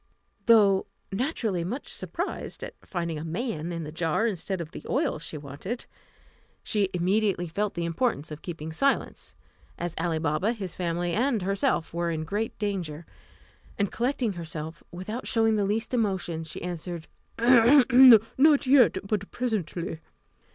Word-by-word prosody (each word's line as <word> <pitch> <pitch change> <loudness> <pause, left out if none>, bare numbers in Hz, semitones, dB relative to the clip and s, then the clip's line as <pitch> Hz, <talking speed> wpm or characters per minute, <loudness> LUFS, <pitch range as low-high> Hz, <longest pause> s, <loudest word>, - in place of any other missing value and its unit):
Though 205 -4 +5 0.2
naturally 220 - -1
much 235 +11 -4
surprised - - -4
at - - -6
finding 170 -4 -3
a - - -6
man 170 -1 -3
in 165 -1 -4
the 150 - -6
jar 165 +6 0
instead 190 -3 -2
of 165 -2 -6
the - - -9
oil 275 - 0
she 155 0 -7
wanted, 145 - -6 0.8
she 205 -4 0
immediately 185 0 +1
felt 200 +5 -2
the 170 -1 -2
importance 170 - -1
of 150 - -7
keeping 160 -2 -6
silence, 275 +11 0 0.4
as 175 -1 -3
Ali 165 -2 0
Baba, 160 +8 0
his 195 -6 -6
family, 175 -1 -2
and 235 -1 +1
herself 195 -4 0
were 170 0 -1
in 160 -1 -2
great 205 +7 -3
danger; 175 -7 -3 0.7
and 200 -2 0
collecting 245 -3 0
herself, 160 -1 -6
without 185 +8 -6
showing 225 -1 +3
the 205 -2 +1
least 220 +5 -1
emotion, 190 -8 -1
she 160 - -8
answered, 175 -1 -5 0.3
"Not 250 +3 +6
yet, 255 -6 +5
but 200 -1 -2
presently." 185 -9 -3
190 Hz, 145 wpm, -27 LUFS, 165-225 Hz, 0.8 s, Not